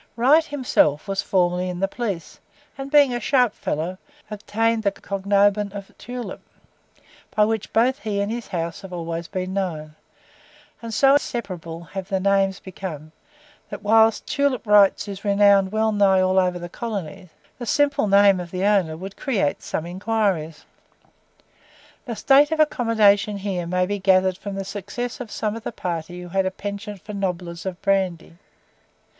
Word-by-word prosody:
Wright 275 Hz, +8 st, +5 dB
himself 250 Hz, -, +1 dB
was 195 Hz, 0 st, -1 dB
formerly 180 Hz, -1 st, +1 dB
in 180 Hz, -1 st, -5 dB
the 195 Hz, -, +1 dB
police, 195 Hz, -9 st, -5 dB, 0.4 s
and 270 Hz, 0 st, -7 dB
being 285 Hz, -3 st, +5 dB
a 240 Hz, -, -1 dB
sharp 250 Hz, -4 st, +2 dB
fellow, 170 Hz, +5 st, -3 dB, 0.3 s
obtained 225 Hz, +2 st, 0 dB
the 205 Hz, -, +2 dB
cognomen 200 Hz, +1 st, +1 dB
of 200 Hz, -1 st, -9 dB
"Tulip," 245 Hz, 0 st, -7 dB, 0.9 s
by 210 Hz, -, +5 dB
which 220 Hz, -1 st, -2 dB
both 250 Hz, +4 st, +2 dB
he 210 Hz, -2 st, -3 dB
and 200 Hz, +2 st, -1 dB
his 235 Hz, 0 st, -5 dB
house 170 Hz, -3 st, -4 dB
have 195 Hz, -, -10 dB
always 170 Hz, -1 st, -4 dB
been 185 Hz, -1 st, -4 dB
known; 160 Hz, -6 st, -3 dB, 0.9 s
and 230 Hz, -1 st, -6 dB
so 270 Hz, +5 st, +4 dB
inseparable 180 Hz, -, -3 dB
have 185 Hz, +4 st, -7 dB
the 190 Hz, -2 st, 0 dB
names 195 Hz, 0 st, +2 dB
become, 170 Hz, -5 st, -8 dB, 0.6 s
that, -, -, -8 dB
whilst 220 Hz, +1 st, +4 dB
"Tulip 280 Hz, -4 st, 0 dB
Wright's" 205 Hz, -1 st, +4 dB
is 195 Hz, -1 st, -7 dB
renowned 200 Hz, -2 st, +4 dB
well 220 Hz, 0 st, +1 dB
nigh 200 Hz, -2 st, +4 dB
all 185 Hz, 0 st, +3 dB
over 180 Hz, -1 st, +1 dB
the 175 Hz, 0 st, -6 dB
colonies, 195 Hz, -3 st, -6 dB, 0.3 s
the 240 Hz, -, -6 dB
simple 285 Hz, -5 st, +2 dB
name 200 Hz, -1 st, +5 dB
of 175 Hz, -1 st, -6 dB
the 185 Hz, +2 st, -3 dB
owner 190 Hz, -7 st, +2 dB
would 190 Hz, +3 st, -8 dB
create 205 Hz, -, -1 dB
some 160 Hz, -, -4 dB
inquiries. 185 Hz, -4 st, -2 dB, 1.4 s
The 235 Hz, -4 st, -4 dB
state 275 Hz, +7 st, +5 dB
of 320 Hz, -, -1 dB
accommodation 220 Hz, -8 st, +3 dB
here 190 Hz, -3 st, -3 dB
may 180 Hz, +1 st, +1 dB
be 205 Hz, +2 st, -3 dB
gathered 185 Hz, -1 st, +3 dB
from 200 Hz, 0 st, -6 dB
the 195 Hz, 0 st, -4 dB
success 205 Hz, +5 st, -5 dB
of 250 Hz, -3 st, -7 dB
some 215 Hz, 0 st, -3 dB
of 230 Hz, -, -7 dB
the -, -, -4 dB
party 175 Hz, -3 st, -5 dB
who 175 Hz, -, -9 dB
had 190 Hz, +1 st, +1 dB
a -, -, +1 dB
PENCHANT 200 Hz, +1 st, -7 dB
for 210 Hz, -, -8 dB
"nobblers" 180 Hz, -2 st, -4 dB
of 185 Hz, -1 st, -5 dB
brandy. 185 Hz, -4 st, -1 dB
200 Hz, 165 wpm, -23 LUFS, 180-220 Hz, 1.4 s, Wright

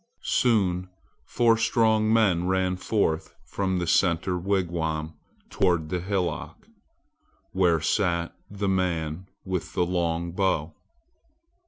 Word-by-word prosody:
Soon 95 Hz, -7 st, +1 dB, 0.4 s
four 115 Hz, -1 st, +3 dB
strong 110 Hz, -1 st, +2 dB
men 95 Hz, -6 st, +3 dB
ran 95 Hz, 0 st, +1 dB
forth 90 Hz, -4 st, -1 dB
from 95 Hz, -2 st, -2 dB
the 90 Hz, -, -1 dB
center 85 Hz, +1 st, +2 dB
wigwam 85 Hz, -4 st, -1 dB, 0.4 s
toward 85 Hz, -5 st, +1 dB
the 90 Hz, -, -1 dB
hillock, 95 Hz, 0 st, -3 dB, 0.8 s
where 90 Hz, -3 st, +2 dB
sat 85 Hz, 0 st, 0 dB
the 100 Hz, 0 st, -3 dB
man 90 Hz, -2 st, -1 dB, 0.2 s
with 90 Hz, -3 st, -3 dB
the 90 Hz, -, +1 dB
long 85 Hz, -1 st, -1 dB
bow. 85 Hz, -4 st, 0 dB
90 Hz, 110 wpm, -26 LUFS, 85-100 Hz, 0.8 s, four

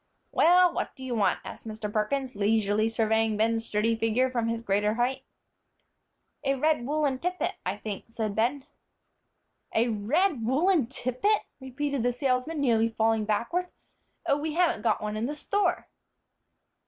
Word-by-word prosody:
"Well, 355 Hz, +1 st, +5 dB
what -, -, -3 dB
do 265 Hz, -, -11 dB
you 255 Hz, -2 st, -3 dB
want?" 205 Hz, -5 st, +1 dB
asked -, -, -9 dB
Mr. 215 Hz, -1 st, -5 dB
Perkins, 255 Hz, +5 st, -1 dB
leisurely 210 Hz, +1 st, +2 dB
surveying 220 Hz, -1 st, +1 dB
Ben's 225 Hz, +1 st, +1 dB
sturdy 220 Hz, +2 st, +1 dB
figure 225 Hz, +3 st, +1 dB
from 235 Hz, -2 st, -1 dB
his 230 Hz, 0 st, -2 dB
greater 210 Hz, +1 st, +1 dB
height. 255 Hz, +3 st, 0 dB, 1.2 s
"A 275 Hz, -, +1 dB
red 285 Hz, -3 st, +1 dB
woollen 290 Hz, -3 st, 0 dB
tippet, 360 Hz, +3 st, -1 dB
I 190 Hz, +2 st, -2 dB
think," 210 Hz, -2 st, -6 dB
said 220 Hz, -3 st, -3 dB
Ben. 260 Hz, +5 st, 0 dB, 1.1 s
"A 230 Hz, +2 st, +3 dB
red 250 Hz, -, +1 dB
woollen 290 Hz, -, +2 dB
tippet!" 265 Hz, -, 0 dB, 0.2 s
repeated 280 Hz, +1 st, -3 dB
the 245 Hz, +1 st, +2 dB
salesman, 260 Hz, +4 st, -1 dB
nearly 230 Hz, -4 st, +3 dB
falling 225 Hz, -1 st, +1 dB
backward. 235 Hz, -, -1 dB, 0.6 s
"Oh, 280 Hz, -, +2 dB
we 310 Hz, +1 st, -3 dB
haven't 340 Hz, -9 st, +2 dB
got -, -, +1 dB
one 210 Hz, 0 st, -3 dB
in 220 Hz, +3 st, -1 dB
the 295 Hz, -, -4 dB
store!" 370 Hz, +2 st, 0 dB
240 Hz, 155 wpm, -27 LUFS, 220-285 Hz, 1.2 s, Well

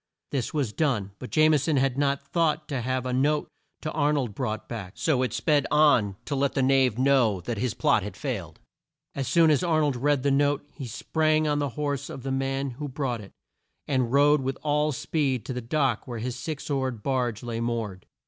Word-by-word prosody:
This 130 Hz, -4 st, -1 dB
was 135 Hz, -8 st, -1 dB
done, 120 Hz, -11 st, 0 dB
but 125 Hz, -, -7 dB
Jame 155 Hz, -1 st, +4 dB
son 145 Hz, +1 st, 0 dB
had 135 Hz, -1 st, +2 dB
not 140 Hz, 0 st, 0 dB
thought 160 Hz, -2 st, 0 dB
to 135 Hz, -4 st, -2 dB
have 130 Hz, +1 st, -1 dB
the 130 Hz, -1 st, -2 dB
note 145 Hz, +4 st, +1 dB, 0.3 s
to 155 Hz, -, -3 dB
Ar 150 Hz, -1 st, +2 dB
nold 130 Hz, -7 st, -1 dB
brought 110 Hz, -2 st, -3 dB
back, 100 Hz, -5 st, -6 dB
so 145 Hz, -6 st, +1 dB
it 125 Hz, -3 st, 0 dB
sped 145 Hz, +4 st, +1 dB
on 145 Hz, -10 st, +4 dB
to 145 Hz, -, -3 dB
let 140 Hz, 0 st, 0 dB
the 135 Hz, -, +2 dB
knave 130 Hz, -3 st, +3 dB
know 130 Hz, -7 st, +3 dB
that 110 Hz, +4 st, -4 dB
his 125 Hz, -1 st, -1 dB
plot -, -, +3 dB
had -, -, -7 dB
failed. -, -, -5 dB, 0.5 s
As 135 Hz, -2 st, -3 dB
soon 160 Hz, +3 st, +5 dB
as 150 Hz, -, +3 dB
Ar 165 Hz, -3 st, +2 dB
nold 145 Hz, -3 st, +1 dB
read 140 Hz, +1 st, +1 dB
the 140 Hz, -, +2 dB
note 145 Hz, +1 st, +1 dB
he 135 Hz, -4 st, -7 dB
sprang 155 Hz, +6 st, +1 dB
on 145 Hz, -1 st, +1 dB
the 145 Hz, -1 st, 0 dB
horse 145 Hz, -2 st, -2 dB
of 130 Hz, -, -8 dB
the 135 Hz, -, -3 dB
man 135 Hz, 0 st, -1 dB
who 145 Hz, +5 st, -6 dB
brought 130 Hz, -4 st, -2 dB
it, 100 Hz, -, -12 dB, 0.6 s
and 130 Hz, -4 st, 0 dB
rode 145 Hz, +1 st, +5 dB
with 135 Hz, 0 st, -2 dB
all 150 Hz, 0 st, +1 dB
speed 135 Hz, -4 st, -1 dB
to 130 Hz, -, -4 dB
the 125 Hz, -, -4 dB
dock 130 Hz, -1 st, 0 dB
where 120 Hz, -2 st, -5 dB
his 120 Hz, +2 st, -3 dB
six 145 Hz, +3 st, -5 dB
oared 130 Hz, -6 st, -2 dB
barge 125 Hz, -5 st, -1 dB
lay 115 Hz, -1 st, -3 dB
moored. 115 Hz, -5 st, -3 dB
135 Hz, 215 wpm, -26 LUFS, 125-145 Hz, 0.6 s, soon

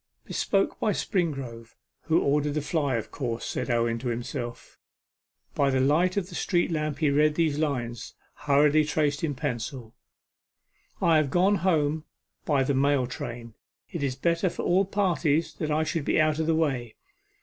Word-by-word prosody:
'Bespoken 195 Hz, -1 st, 0 dB
by 210 Hz, -, +1 dB
Springrove, 135 Hz, -, -3 dB, 0.3 s
who 160 Hz, -, +3 dB
ordered 145 Hz, +1 st, +1 dB
the 150 Hz, -, 0 dB
fly, 145 Hz, -4 st, 0 dB
of 115 Hz, -, -4 dB
course,' 120 Hz, -5 st, -3 dB
said 125 Hz, -, -3 dB
Owen 115 Hz, -1 st, +1 dB
to 125 Hz, -, -5 dB
himself. 120 Hz, 0 st, -5 dB, 0.7 s
By 140 Hz, -1 st, +2 dB
the 130 Hz, -1 st, +1 dB
light 160 Hz, +8 st, +2 dB
of 190 Hz, -3 st, 0 dB
the 185 Hz, -, -12 dB
street 175 Hz, 0 st, 0 dB
lamp 155 Hz, -2 st, -1 dB
he 150 Hz, -2 st, +2 dB
read 150 Hz, +1 st, +3 dB
these 155 Hz, -3 st, +1 dB
lines, 120 Hz, -7 st, -3 dB, 0.2 s
hurriedly 150 Hz, +2 st, +3 dB
traced 150 Hz, -1 st, 0 dB
in 145 Hz, -4 st, -1 dB
pencil: 125 Hz, -3 st, -4 dB, 1.1 s
'I 165 Hz, -1 st, +5 dB
have 155 Hz, -3 st, +2 dB
gone 185 Hz, +6 st, +3 dB
home 155 Hz, -3 st, +1 dB, 0.4 s
by 140 Hz, -3 st, +2 dB
the 140 Hz, -, 0 dB
mail 140 Hz, -1 st, +2 dB
train. 120 Hz, -2 st, -7 dB, 0.4 s
It 170 Hz, -5 st, -4 dB
is 135 Hz, -2 st, -1 dB
better 170 Hz, +6 st, +1 dB
for -, -, -5 dB
all 190 Hz, +3 st, +3 dB
parties 165 Hz, -5 st, +1 dB
that 155 Hz, -, -2 dB
I 155 Hz, +1 st, +1 dB
should 155 Hz, -1 st, -2 dB
be -, -, +2 dB
out 155 Hz, 0 st, +2 dB
of 160 Hz, -, 0 dB
the 165 Hz, -, +3 dB
way. 130 Hz, -8 st, -1 dB
150 Hz, 170 wpm, -27 LUFS, 130-160 Hz, 1.1 s, I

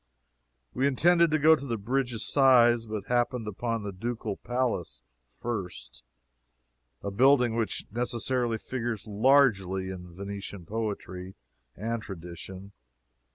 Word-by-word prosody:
We 130 Hz, +2 st, +2 dB
intended 170 Hz, +5 st, +4 dB
to 155 Hz, -, +2 dB
go 155 Hz, +1 st, +6 dB
to 150 Hz, -, -8 dB
the 115 Hz, -2 st, -1 dB
Bridge 125 Hz, +5 st, -1 dB
of 115 Hz, -, -3 dB
Sighs, 120 Hz, -4 st, +5 dB
but 105 Hz, -2 st, -4 dB
happened 120 Hz, -1 st, 0 dB
into 115 Hz, +3 st, -2 dB
the 100 Hz, -, -4 dB
Ducal 110 Hz, +1 st, -4 dB
Palace 120 Hz, -, -2 dB, 0.2 s
first 100 Hz, -, -6 dB, 1.0 s
a 100 Hz, -, -3 dB
building 125 Hz, +1 st, +4 dB
which 115 Hz, -4 st, -2 dB
necessarily 120 Hz, 0 st, -1 dB
figures 120 Hz, -2 st, -4 dB
largely 100 Hz, -5 st, +3 dB
in 90 Hz, -2 st, -9 dB
Venetian 100 Hz, -1 st, -7 dB
poetry 100 Hz, -3 st, -5 dB, 0.4 s
and 115 Hz, +3 st, -3 dB
tradition. 95 Hz, +1 st, -9 dB
115 Hz, 120 wpm, -28 LUFS, 100-125 Hz, 1.0 s, go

